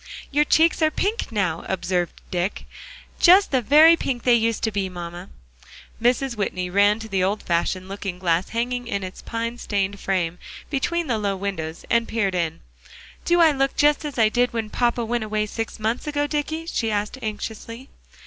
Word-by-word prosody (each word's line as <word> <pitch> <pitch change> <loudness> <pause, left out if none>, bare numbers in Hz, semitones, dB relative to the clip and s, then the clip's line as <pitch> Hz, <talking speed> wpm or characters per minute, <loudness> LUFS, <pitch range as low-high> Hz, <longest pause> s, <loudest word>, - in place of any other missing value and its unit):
"Your 295 +1 +3
cheeks 325 +2 +3
are 310 - +5
pink 405 - -2
now," 185 -6 -1
observed 175 -2 -2
Dick; 180 +2 -2 0.5
"just 380 +3 +6
the 260 -2 +2
very 305 +7 +7
pink 255 -7 -3
they 245 - +4
used 230 -1 +1
to 220 - +1
be, 195 -2 -2
mamma." 175 0 -8 0.7
Mrs. 245 +1 +1
Whitney 180 -3 -2
ran 205 +2 +4
to 225 0 -8
the 195 -3 0
old 200 +3 -1
fashioned 185 +2 -1
looking 195 -2 -5
glass 175 0 0
hanging 245 +1 -2
in 200 -4 -2
its 185 0 -7
pine 230 +1 -4
stained 200 -2 -2
frame, 180 -3 -1 0.3
between 340 +5 0
the 235 -6 -1
low 200 -2 -1
windows, 185 -5 -5
and 235 0 +2
peered 205 -4 0
in. 165 -3 -2 0.6
"Do 345 0 +4
I 325 -2 +7
look 270 -1 0
just 295 +1 +3
as 290 -4 -5
I 225 -2 +5
did 245 +3 +1
when 220 -2 -3
papa 240 -1 0
went 235 0 -1
away 215 0 -1
six 225 +1 -5
months 225 +6 -2
ago, 290 -1 0
Dicky?" 305 +2 -3
she 230 -9 -1
asked, 210 +4 -2
anxiously. 230 +3 -6
220 Hz, 185 wpm, -23 LUFS, 190-260 Hz, 0.7 s, very